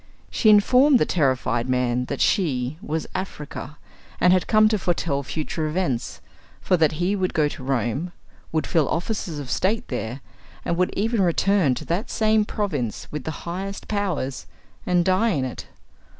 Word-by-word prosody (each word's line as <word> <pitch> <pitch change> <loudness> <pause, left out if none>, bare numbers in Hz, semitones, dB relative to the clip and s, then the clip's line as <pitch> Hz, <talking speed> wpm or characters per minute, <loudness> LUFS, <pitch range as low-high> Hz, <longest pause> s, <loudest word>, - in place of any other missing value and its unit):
She 220 - +3
informed 250 +7 +6
the - - +2
terrified 130 -5 0
man 125 -1 +1
that - - -4
she 145 - +1
was 160 -2 -3
"Africa," 150 -5 -6 0.4
and 180 - +5
had 185 -3 +1
come 215 0 +5
to 215 -1 0
foretell 165 -6 0
future 155 +2 -3
events; 155 -7 -2 0.4
for 185 - +2
that 160 -3 +3
he 175 +6 0
would 185 -2 -1
go 155 -2 +3
to 140 - -7
Rome, 135 +5 -1 0.4
would 160 -1 0
fill 160 -5 +1
offices 175 -2 -2
of 140 -3 -6
state 210 +4 0
there, 125 +1 -4 0.4
and 170 - 0
would 180 +1 +1
even 220 +2 +1
return 180 -4 +2
to - - -7
that 185 +8 -2
same 215 -1 +2
province 150 - -3
with 150 -3 -5
the 160 - -6
highest 190 +3 -5
powers, 180 -11 -2 0.4
and 175 -1 +3
die 190 +5 +3
in 135 -4 0
it. 130 - -7
170 Hz, 165 wpm, -23 LUFS, 140-195 Hz, 0.4 s, informed